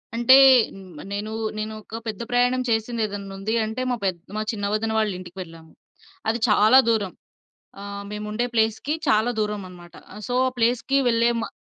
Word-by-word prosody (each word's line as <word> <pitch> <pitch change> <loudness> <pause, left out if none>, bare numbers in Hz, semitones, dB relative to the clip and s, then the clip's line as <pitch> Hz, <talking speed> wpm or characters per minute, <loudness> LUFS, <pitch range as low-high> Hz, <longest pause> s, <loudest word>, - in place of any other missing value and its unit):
అంటే, 240 +3 +6 0.4
హ్మ్. 185 -6 -12
నేనూ 210 +2 -4 0.2
నేనొక 215 +1 -6
పెద్ద 215 -1 -4
ప్రయాణం 245 +1 +2
చేసింది 225 +1 -1
ఏదన్నుంది 200 +1 -5
అంటే, 220 +4 -4
మా 245 - +1
పెద్ 185 -3 -1 0.2
మా - - -1
చిన్న 205 -2 -4
వదిన 220 +1 -1
వాళ్ళింటికెళ్ళాము. 180 -5 -5 0.6
అది 230 - 0
చాలా 215 +5 +6
దూరం. 210 -5 0 0.7
ఆహ్, 200 0 -7
మేముండే 210 +3 -3
ప్లేస్‌కి, 225 +6 0
చాలా 220 +1 +3
దూరమనమాట. 185 -5 -5 0.2
ఆహ్, 210 - -10
సో, 245 - -1
ఆ 255 - -2
ప్లేస్‌కి 240 +3 +1
వెళ్ళే 230 +1 +3
మా - - -3
215 Hz, 150 wpm, -23 LUFS, 200-230 Hz, 0.7 s, అంటే